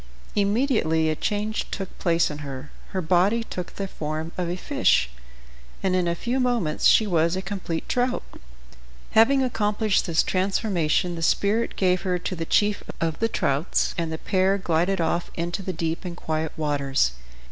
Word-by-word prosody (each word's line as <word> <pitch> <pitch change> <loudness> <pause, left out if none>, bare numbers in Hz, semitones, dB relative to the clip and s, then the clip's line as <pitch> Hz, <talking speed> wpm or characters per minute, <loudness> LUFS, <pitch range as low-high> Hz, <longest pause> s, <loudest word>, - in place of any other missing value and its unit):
Immediately 200 - +2
a - - -1
change 210 +5 -2
took 195 -2 -5
place 170 -3 +2
in 150 - -7
her. 140 -1 -7 0.2
Her 185 -2 -3
body 185 +8 +3
took 180 -5 -6
the 195 - -3
form 155 -1 -4
of 180 -2 -2
a 175 - -1
fish, 65 - +2 0.7
and 185 -1 +2
in 180 -1 +1
a 170 - +1
few 240 +8 -1
moments 240 -11 +1
she 220 - +6
was 170 -3 +2
a 190 - -2
complete 180 -4 -4
trout. 250 0 0 0.9
Having 265 +5 +5
accomplished 215 -4 +1
this 165 -2 +3
transformation 185 -3 0
the 165 - -5
spirit 205 +7 +1
gave 185 -1 +2
her 180 -2 0
to 180 +1 -4
the 165 -1 -4
chief 205 +4 +2 0.2
of 165 -2 -1
the 225 - +1
trouts, 140 -2 0
and 165 -2 -2
the 160 - -3
pair 190 +3 +1
glided 180 +1 +1
off 170 +1 0
into 175 +3 -3
the 185 - -3
deep 165 0 -3
and 175 -2 -6
quiet 160 -1 -2
waters. 140 - +1
180 Hz, 170 wpm, -24 LUFS, 160-205 Hz, 0.9 s, she